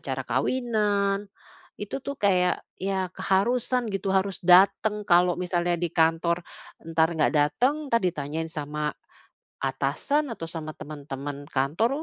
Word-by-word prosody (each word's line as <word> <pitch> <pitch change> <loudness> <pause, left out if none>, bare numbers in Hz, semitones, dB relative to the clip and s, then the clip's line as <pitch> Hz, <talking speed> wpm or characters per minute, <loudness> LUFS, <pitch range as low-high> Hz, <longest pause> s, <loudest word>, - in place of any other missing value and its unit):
acara - - -3
kawinan. 205 -5 0 0.5
Itu 205 +6 -4
tuh 280 +1 -5
kayak 185 -6 +2 0.2
iya 190 -1 -1
keharusan 240 +6 +1
gitu, 195 0 -2
harus 190 -1 0
datang. 200 +4 +5
Kalau 175 0 +5
misalnya 175 -1 0
di 175 0 -1
kantor 165 +1 +2 0.4
entar 160 0 +2
enggak 160 -2 +1
datang, 250 - +1
entar 230 -2 +3
ditanyain 160 -3 -2
sama 150 0 -3 0.7
atasan 150 - 0
atau 165 - -6
sama 155 -2 -6
teman-teman 145 -1 -7
kantor, 145 - +1
180 Hz, 125 wpm, -26 LUFS, 160-210 Hz, 0.7 s, datang